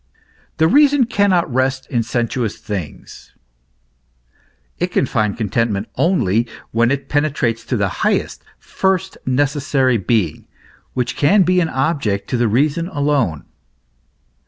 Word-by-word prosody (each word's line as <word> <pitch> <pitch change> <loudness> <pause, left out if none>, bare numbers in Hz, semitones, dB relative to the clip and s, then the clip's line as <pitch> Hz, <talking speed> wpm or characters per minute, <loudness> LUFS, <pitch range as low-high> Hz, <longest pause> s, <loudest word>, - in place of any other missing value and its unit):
" - - -36
The 160 - +4
reason 285 - +4
cannot 195 - +1
rest 130 +1 0
in 120 - +1
sensuous 120 -1 -2
things 95 -8 -8 0.7
;" - - -40
it - - +1
can - - 0
find 105 -2 -1
contentment 110 -1 -1
only 120 - +1 0.2
when 120 +1 +2
it 140 0 -2
penetrates 140 -6 0
to 125 - -1
the 100 -2 +1
highest, - - 0
first, 190 0 -1
necessary 135 -1 +1
being, 95 -5 -1 0.5
which 125 -1 -2
can 190 +7 +4
be 180 +1 +2
an 165 -2 +1
object 135 -9 -1
to 125 - +1
the 120 -1 +2
reason 145 +9 +1
alone. 145 - -1
130 Hz, 135 wpm, -18 LUFS, 110-155 Hz, 0.7 s, The